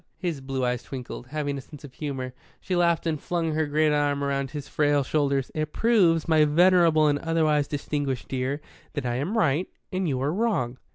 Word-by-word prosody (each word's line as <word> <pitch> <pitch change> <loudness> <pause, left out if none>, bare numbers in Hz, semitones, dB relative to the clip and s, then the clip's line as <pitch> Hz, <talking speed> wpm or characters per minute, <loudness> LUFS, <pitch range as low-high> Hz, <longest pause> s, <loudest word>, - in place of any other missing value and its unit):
His 170 -7 -3
blue 135 -1 -2
eyes 125 -1 -1
twinkled. 125 -2 -7
Having 145 0 -3
a - - -7
sense 150 +2 -14
of 140 -3 -11
humour, 130 -3 -4 0.3
she 185 - -2
laughed 170 -1 +2
and 155 -3 -1
flung 170 -2 -1
her 155 0 0
great 155 +1 +2
arm 145 -1 +1
round 140 -1 -1
his 145 -1 -6
frail 145 -1 +2
shoulders. 140 -2 0
"It 155 -1 -3
proves, 185 -9 +3
my 160 -2 +5
venerable 165 0 +5
and 145 -1 +2
otherwise 155 -3 +1
distinguished 145 -3 -3
dear, 135 +3 -2 0.3
that 145 -3 -3
I 120 0 -1
am 175 - -2
right 160 -3 +2 0.3
and 185 -2 0
you 130 -2 -1
are 145 +3 0
wrong." 180 - 0
150 Hz, 195 wpm, -26 LUFS, 135-165 Hz, 0.3 s, my